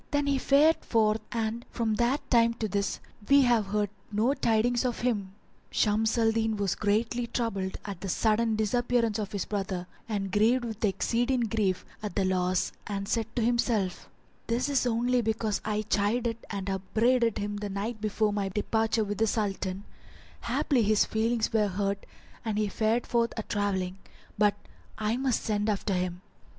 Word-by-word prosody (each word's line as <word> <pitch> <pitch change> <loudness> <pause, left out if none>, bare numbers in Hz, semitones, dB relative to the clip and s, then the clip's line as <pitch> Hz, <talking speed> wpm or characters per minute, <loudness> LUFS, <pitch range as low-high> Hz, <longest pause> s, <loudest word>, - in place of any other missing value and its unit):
Then 290 -1 +1
he 280 -1 +1
fared 295 +5 +5
forth 220 -1 +2
and 230 0 -2
from 225 -2 -1
that 240 +5 +1
time 230 -1 +4
to 225 -2 -2
this 200 0 -1 0.3
we 280 0 +7
have 235 -5 +3
heard 205 0 0 0.2
no 220 +6 +2
tidings 240 -1 +2
of 250 -2 -2
him." 205 -6 -1 0.3
Shams 220 +2 +1
al 225 -1 +4
Din 220 -1 0
was 200 -2 0
greatly 225 +3 0
troubled 200 -6 -2
at 195 -3 -6
the 195 - -4
sudden 220 +3 +2
disappearance 230 0 +1
of 205 -1 -3
his 200 -4 -2
brother 195 -3 -3 0.2
and 195 -3 -2
grieved 230 +5 +3
with 225 -1 -6
exceeding 240 +5 +1
grief 210 -5 0 0.2
at 210 -4 -5
the 195 - +2
loss 185 -1 +1 0.2
and 195 -1 -3
said 225 0 0
to 235 - +1
himself, 230 -5 0 0.4
"This 240 +4 0
is 270 -3 +2
only 245 +1 +2
because 220 -2 -1
I 215 0 -1
chided 225 +3 0
and 200 -2 -4
upbraided 225 +5 +1
him 205 0 -3
the 205 0 -4
night 210 +3 -4
before 215 0 +1
my 200 -1 -1
departure 220 +3 0
with 205 0 -4
the 225 - +3
Sultan; 200 -3 -2 0.6
haply 265 -5 +1
his 215 -1 +3
feelings 225 +1 0
were 215 -2 +3
hurt 200 +1 -2 0.4
and 220 -2 -2
he 210 -1 +1
fared 220 +4 +1
forth 235 -1 +1
a 220 - -2
travelling; 195 -3 -2 0.4
but 205 -1 +3 0.4
I 215 +1 0
must 260 -2 0
send 210 0 0
after 205 -1 0
him." 180 -1 -2
220 Hz, 170 wpm, -28 LUFS, 205-235 Hz, 0.6 s, we